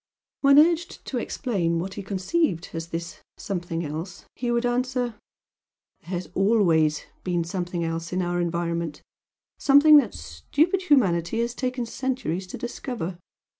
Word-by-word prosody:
When 275 0 +6
urged 335 +3 +3
to 255 - -2
explain 190 -10 -1
what 185 +3 -3
he 205 - -5
conceived 190 - -1
as 165 0 -4
this 170 +1 -6 0.2
"something 175 -3 -3
else," 160 +5 -6
he 245 - -3
would 240 0 +1
answer 250 0 0 0.9
"There - - -17
has 180 -1 -3
always 170 -7 +3 0.2
been 175 -2 0
'something 175 0 -3
else' 165 0 -3
in 185 0 0
our 175 0 0
environment, 170 -2 -2 0.6
something 295 +2 +7
that 290 - +2
stupid 355 +6 0
humanity 225 - +2
has 235 0 -1
taken 250 -1 -2
centuries 230 - -3
to - - -7
discover. 235 -7 -5
190 Hz, 140 wpm, -25 LUFS, 170-250 Hz, 0.9 s, something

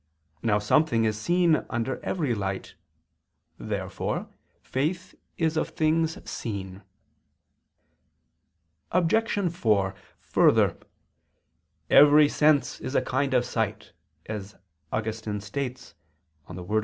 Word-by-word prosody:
Now 105 -3 +2
something 115 +3 +2
is 110 -1 +1
seen 170 +7 +2
under 120 +2 -3
every 150 -9 -1
light. 95 -3 -4 0.9
Therefore - - -3 0.4
faith 175 +7 -2 0.2
is 160 -1 0
of - - 0
things 160 +1 +1
seen. 95 -3 -5 2.1
Obj. 185 +1 +1
4: 105 - +1 0.3
Further, - - +3 1.2
"Every 150 +1 +8
sense 150 -1 +2
is 130 - -5
a - - +3
kind 130 +1 0
of 125 -1 +3
sight," 110 -3 -3 0.3
as 105 -1 -6 0.4
Augustine 110 -1 -3
states 125 +4 -5 0.5
(De 90 +2 -8
Verb. 105 +5 +1
125 Hz, 100 wpm, -26 LUFS, 105-155 Hz, 2.1 s, Every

